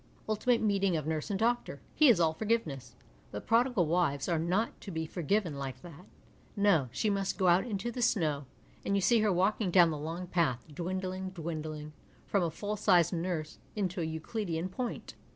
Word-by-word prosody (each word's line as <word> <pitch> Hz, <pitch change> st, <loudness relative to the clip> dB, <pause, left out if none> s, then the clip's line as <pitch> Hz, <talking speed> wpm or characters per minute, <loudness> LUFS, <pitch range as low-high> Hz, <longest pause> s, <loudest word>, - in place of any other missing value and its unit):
Ultimate 225 Hz, +3 st, +1 dB
meeting 195 Hz, -4 st, +2 dB
of 155 Hz, -, -4 dB
nurse 155 Hz, -1 st, -2 dB
and 200 Hz, -, 0 dB
doctor; 240 Hz, +2 st, 0 dB
he 305 Hz, -3 st, +6 dB
is 220 Hz, -7 st, +5 dB
all 160 Hz, -2 st, +3 dB
forgiveness, 155 Hz, -, -2 dB, 0.3 s
but 105 Hz, -, -7 dB
prodigal 230 Hz, -5 st, +3 dB
wives 155 Hz, -4 st, +1 dB
are 170 Hz, -2 st, +1 dB
not 180 Hz, +7 st, -1 dB
to -, -, -8 dB
be 160 Hz, -3 st, -3 dB
forgiven 170 Hz, -1 st, -1 dB
like 130 Hz, -2 st, -6 dB
that. 175 Hz, +2 st, -12 dB, 0.5 s
No, 195 Hz, -11 st, +3 dB
she 215 Hz, -, -1 dB
nuist 195 Hz, -1 st, -1 dB
go 190 Hz, -, +1 dB
ojit 180 Hz, +6 st, +4 dB
into 210 Hz, +3 st, -2 dB
the 245 Hz, -, -5 dB
snow, 155 Hz, -11 st, +1 dB, 0.4 s
and 200 Hz, -, 0 dB
you -, -, +1 dB
see 235 Hz, +4 st, +4 dB
her 215 Hz, -1 st, +2 dB
walking 190 Hz, +2 st, +1 dB
down 175 Hz, -2 st, +6 dB
the 150 Hz, -, -4 dB
long 165 Hz, +4 st, -4 dB
path, 165 Hz, -9 st, 0 dB
dwindling, 185 Hz, +3 st, -3 dB
dwindling, 155 Hz, -3 st, -6 dB, 0.3 s
from 200 Hz, -, +1 dB
a 170 Hz, -, +1 dB
full 205 Hz, +6 st, -4 dB
sized 180 Hz, -4 st, +4 dB
nurse 165 Hz, -3 st, -3 dB, 0.2 s
into 190 Hz, -3 st, -1 dB
a -, -, -1 dB
Euclidean 165 Hz, +2 st, -3 dB
point. 245 Hz, +5 st, -5 dB
180 Hz, 190 wpm, -31 LUFS, 160-205 Hz, 0.5 s, he